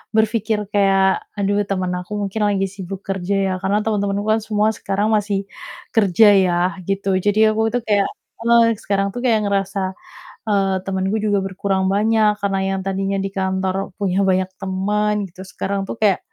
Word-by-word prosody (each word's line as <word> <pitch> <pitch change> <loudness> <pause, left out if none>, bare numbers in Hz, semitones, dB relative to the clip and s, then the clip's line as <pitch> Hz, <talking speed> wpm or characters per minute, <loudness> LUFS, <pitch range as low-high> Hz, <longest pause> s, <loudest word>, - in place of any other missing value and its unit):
berpikir 220 -1 +1
kayak, 195 -1 +3
"Aduh, 200 0 +1
temen 185 -2 -1
aku 180 +4 -8
mungkin 200 +2 -3
lagi 195 -1 +1
sibuk 195 0 -7
kerja 195 0 -2
ya." - - -1
Karena 200 +2 +1
temen-temenku 200 -2 -1
kan 220 - +3
semua 215 0 +2
sekarang 200 +2 -1
masih 205 -2 +1 0.6
kerja 210 0 +5 0.2
ya, 175 -1 +1 0.3
gitu. 195 0 -1 0.2
Jadi, 205 +1 +2
aku 220 +1 0
itu 245 - +2
kayak 205 -2 +3 0.3
heeh, 235 0 +4 0.2
sekarang 195 0 0
tuh - - -5
kayak 225 -3 +3
ngerasa, 195 0 -1 0.7
eee, 195 -2 +2
temenku 190 +2 -1
juga 205 -2 +2
berkurang 190 0 -1
banyak, 215 +1 +3
karena 195 -1 0 0.2
yang 190 - -2
tadinya 195 0 -1
di 195 - -3
kantor 190 0 -1
punya 195 -2 0
banyak 185 0 +2
temen 205 +2 0 0.2
gitu, 185 +2 -11
sekarang 195 +1 -3
tuh - - -3
kayak, 205 -4 +3
200 Hz, 165 wpm, -20 LUFS, 190-210 Hz, 0.7 s, kerja